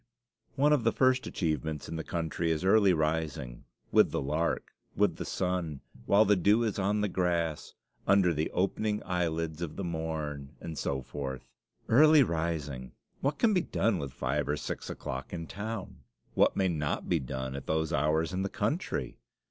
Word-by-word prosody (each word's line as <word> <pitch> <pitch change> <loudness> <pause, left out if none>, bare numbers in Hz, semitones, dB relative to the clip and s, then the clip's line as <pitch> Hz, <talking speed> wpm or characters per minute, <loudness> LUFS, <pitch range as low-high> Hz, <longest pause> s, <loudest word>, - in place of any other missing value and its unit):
One 145 +2 +4
of 140 -6 +2
the 115 - +3
first 130 +1 +2
achievements 80 -3 -2
in - - -5
the 80 - -3
country 85 0 -2
is 80 +2 0
early 100 0 +5
rising: 75 -6 -1 0.3
with - - +5
the - - -1
lark 75 +5 -1 0.2
with - - +2
the - - -4
sun 90 -6 -2 0.3
while 105 +2 +6
the 105 0 +5
dew 105 +5 +3
is 110 -3 -1
on 100 +2 +1
the 105 - +2
grass, 85 -4 -1 0.3
"under 95 -3 +5
the 75 +1 -1
opening 105 +3 0
eye 90 -2 +1
lids 80 0 -3
of 80 -3 -4
the 100 - -4
morn," 80 -4 -4
and 80 - -6
so 65 -1 -2
forth. 65 -2 -5 0.4
Early 150 +4 +7
rising! 80 - -3 0.3
What 140 +2 0
can 225 -3 +3
be 180 - +3
done 110 - 0
with 70 -2 -4
five 75 +4 -2
or 75 - +1
six - - -5
o'clock - - -5
in 85 -1 -4
town? 105 +2 -5 0.4
What - - +3
may 95 - +3
not 75 -4 -2
be - - +2
done 65 +1 -4
at 70 - -7
those 80 +1 0
hours 80 +3 +1
in 95 - -1
the 100 - -1
country? 145 - -2
85 Hz, 180 wpm, -30 LUFS, 75-100 Hz, 0.4 s, Early